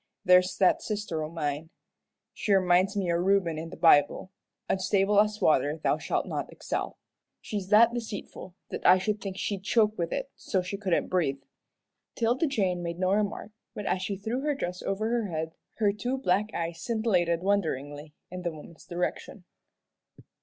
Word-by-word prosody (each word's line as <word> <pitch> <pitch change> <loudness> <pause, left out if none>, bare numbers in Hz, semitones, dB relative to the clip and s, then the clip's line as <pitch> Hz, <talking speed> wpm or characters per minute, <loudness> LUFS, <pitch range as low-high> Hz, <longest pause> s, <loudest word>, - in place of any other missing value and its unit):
There's 180 0 +5
that 190 - +4
sister 205 -7 -3
o' 155 - -4
mine. 155 -1 -3 0.6
She 210 - -3
reminds 185 +1 +3
me 185 -3 0
o' 170 - +2
Reuben 180 -3 +1
in 165 +1 -6
the - - -10
Bible 165 +2 +4 0.4
'unstable 195 +1 +2
as 210 0 +2
water 155 -4 +2
thou 155 - 0
shalt - - -1
not - - -4
excel.' - - -4 0.4
She's 205 -4 -5
that 225 +3 +6
deceitful 215 -5 -6 0.2
that - - -5
I 185 - +7
should 205 +2 -2
think 195 -2 -5
she'd 200 -1 -2
choke 215 0 +2
with 170 - -1
it 275 0 -3
so 185 -2 -1
she 190 +2 -4
couldn't 195 -4 0
breathe." 140 -7 0 0.7
'Tilda 245 +7 +1
Jane 190 -10 0
made 170 -1 -4
no 185 +1 +1
remark, 205 +1 -1 0.2
but 205 - -5
as 185 - 0
she 200 +1 -2
threw 220 +6 -3
her 295 0 0
dress 180 -9 -4
over 205 +3 -2
her 230 -2 0
head 160 -2 -4 0.2
her 205 -3 +2
two 245 +6 -2
black 210 -3 +1
eyes 165 0 -4
scintillated 185 -7 +1
wonderingly 150 -6 -2 0.2
in 180 0 -6
the 175 - -1
woman's 155 +1 -13
direction. 175 +2 -4
190 Hz, 175 wpm, -28 LUFS, 170-210 Hz, 0.7 s, I